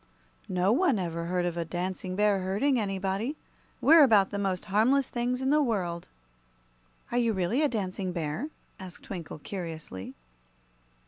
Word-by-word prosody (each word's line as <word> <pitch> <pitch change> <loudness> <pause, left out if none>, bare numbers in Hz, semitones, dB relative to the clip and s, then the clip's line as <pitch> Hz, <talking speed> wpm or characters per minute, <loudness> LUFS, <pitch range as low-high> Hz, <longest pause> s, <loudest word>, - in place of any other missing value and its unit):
"No 185 +2 +2
one 275 - +3
ever 170 -2 -3
heard 180 +1 0
of 175 -1 -2
a 170 - 0
Dancing 185 +2 -4
Bear 205 -1 +3
hurting 205 +9 +1
anybody. 195 +6 -2 0.4
We're 320 +2 +7
about 215 -8 +5
the 200 - -2
most 190 -2 -1
harmless 235 +7 +2
things 250 +2 -1
in 265 - +2
the 300 +1 +4
world." 180 -10 -1 1.0
"Are 245 - +2
you 230 -2 +2
really 190 - 0
a 300 - +3
Dancing 190 -4 -3
Bear?" 170 - -3 0.3
asked 185 -2 -10
Twinkle, 170 -7 -7
curiously. 160 - -7
195 Hz, 150 wpm, -28 LUFS, 180-240 Hz, 1.0 s, We're